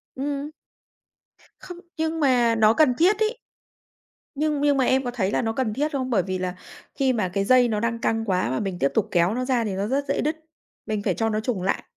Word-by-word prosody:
Ừm. 285 +2 -3 1.1
Không, 355 - -10 0.2
nhưng 320 0 -1
mà 245 -5 +3
nó 220 -1 +4
cần 295 -1 +4
thiết 375 +9 +3
ấy. 440 +2 0 1.0
Nhưng 300 0 0
nhưng 290 -1 +3
mà 260 - +2
em 265 +1 +2
có 245 - -3
thấy 205 -5 -1
là - - +1
nó 225 -2 -1
cần 230 -3 -1
thiết 295 +6 -1
không? 260 -3 -2
Bởi 205 -7 +2
vì 185 0 -3
là 180 0 -3 0.4
khi 265 -2 +1
mà 210 -6 -1
cái 195 0 0
dây 250 +2 +5
nó 215 -3 -1
đang 230 +1 -1
căng 225 0 -1
quá 185 - 0
mà 130 - -1
mình 195 -3 -3
tiếp 140 - +2
tục 220 -1 +1
kéo 175 +2 +2
nó 255 +1 -2
ra 250 -3 +1
thì 215 - -3
nó 195 +2 -2
rất 275 +4 -1
dễ - - 0
đứt, 305 +2 -1 0.5
mình 215 -2 -3
phải 195 - +1
cho 225 +4 -1
nó 215 -1 -1
chùng 220 -3 -2
lại, 190 - -1
240 Hz, 240 wpm, -24 LUFS, 210-280 Hz, 1.1 s, dây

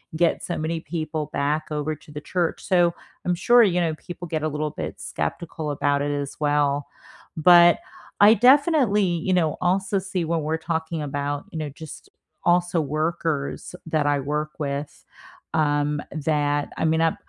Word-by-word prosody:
get 170 0 +2
so 175 - -3
many 160 +1 -2
people 155 -1 -4
back 150 +2 0
over 150 +1 -2
to 150 0 -17
the 150 0 -7
church. 175 0 -2
So 175 -2 +3 0.3
I'm 180 0 +1
sure, 240 +7 +5
you 180 -4 +2
know, 160 -2 0
people 175 +2 -9
get 155 -1 -2
a 155 - +1
little 150 +1 -2
bit - - -6
skeptical 150 - -4
about 145 0 0
it 145 0 -1
as 140 -1 -3
well. 145 -1 +1 0.5
But 175 +1 +7 0.4
I 210 +2 +9
definitely, 260 - +4
you 175 +1 0
know, 165 -4 +2
also 190 +2 +1
see 190 -2 -3
when 165 0 0
we're 155 +2 -1
talking 160 0 -3
about, 145 0 -3
you - - -6
know, 155 -2 -3
just 150 +2 -11 0.4
also 175 0 +2
workers 155 0 -2
that 155 -2 0
I 145 -1 +2
work 150 +2 -2
with, 145 0 -4 0.5
um, 145 -1 +1
that 145 -1 0
I - - -2
mean, 160 0 +2
I 165 -1 +2
155 Hz, 170 wpm, -24 LUFS, 145-175 Hz, 0.5 s, I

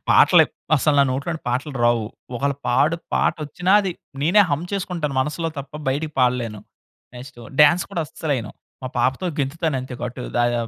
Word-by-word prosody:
పాటలు - - +7 0.3
అసలు 150 +1 +2
నా 140 - +7
నోట్లోని 155 +5 -3
పాటలు 130 +4 -2
రావు. 120 -2 +3 0.3
ఒకవేళ 140 +2 0
పాడు 150 +7 +3 0.2
పాటచ్చినా 160 +4 0
అది 195 - -2 0.3
నేనే 180 +7 +5
హంమ్ 145 +4 0
చేసుకుంటాను 175 -7 -2
మనసులో 155 +4 -2
తప్ప 140 0 -8 0.2
బయటకి 150 +3 -1
పాడలేను. 120 -4 +1 0.6
నెక్స్టు 125 -1 -11 0.2
డాన్స్ 150 +4 +6
కూడా 165 - -1
అస్సలెయ్యను. 135 -9 -3 0.3
మా 130 - -3
పాపతో 130 +8 +1
గెంతుతాను 150 +2 -1
అంతే. 130 0 -7
అటు 125 +1 -8 0.2
దయ 120 0 +2
140 Hz, 150 wpm, -22 LUFS, 125-160 Hz, 0.6 s, పాటలు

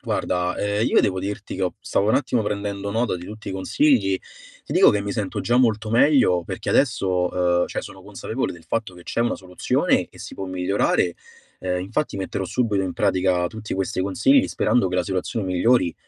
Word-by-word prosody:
Guarda, 90 0 -1
ehm, 105 +2 0
io - - +4
devo 95 -2 0
dirti 100 +1 -5
che 95 - -3
ho 90 - -1
stavo 100 - 0
un 110 - +3
attimo 125 -4 +1
prendendo 100 -1 -3
nota 115 -2 0
di 90 - -9
tutti 110 0 -9
i - - -3
consigli. 95 0 +2 0.5
Ti - - -6
dico - - +6
che 105 - 0
mi 100 - -4
sento 105 -4 -3
già 120 - +1
molto 110 -3 +2
meglio, 115 - +4
perché - - -4
adesso, 90 -6 +2
ehm, - - 0
cioè - - -4
sono - - -11
consapevole - - -4
del 85 -1 -13
fatto 110 -5 -3
che 90 - -13
c'è 115 - -3
una 120 0 +1
soluzione 90 -1 0
e - - -18
si - - -8
può 95 - -5
migliorare, 90 -1 +1 0.4
ehm, 90 -1 -2
infatti 110 +8 -2
metterò 95 0 -3
subito 105 -1 0
in 90 - -3
pratica 95 -3 +1
tutti 110 0 -6
questi 95 -1 -2
consigli, 255 - +3
sperando 120 -6 +1
che 90 - -4
la 90 - +2
situazione 95 +2 -2
migliori. 95 +1 +2
100 Hz, 200 wpm, -23 LUFS, 90-110 Hz, 0.5 s, dico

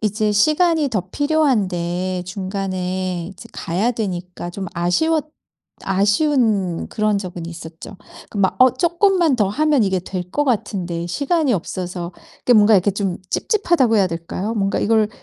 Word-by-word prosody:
이제 215 0 0
시간이 310 - +3
더 215 -7 -1
필요한데 185 - 0
중간에 185 -2 -3
이제 190 - -12
가야 190 +8 -1
되니까 180 -6 -4
좀 190 +2 -6
아쉬웠 295 - +1 0.8
아쉬운 215 - +1
그런 215 -1 0
적은 180 -3 -6
있었죠. 165 +3 -9 0.3
그 210 - -6
막 190 -2 +2
어 255 0 +7
쪼끔만 345 -4 +3
더 210 -4 +2
하면 295 0 +2
이게 190 -1 +1
될 180 0 -6
거 290 - 0
같은데 180 -8 -2
시간이 285 - +1
없어서 180 -2 -4 0.4
그 245 - +6
뭔가 215 -1 +6
이렇게 195 +1 +4
좀 195 -2 -2
찝찝하다고 345 - +2
해야 195 - +4
될까요? 175 +5 -4
뭔가 200 -2 0
이걸 220 -1 +2
200 Hz, 305 characters per minute, -20 LUFS, 180-255 Hz, 0.8 s, 어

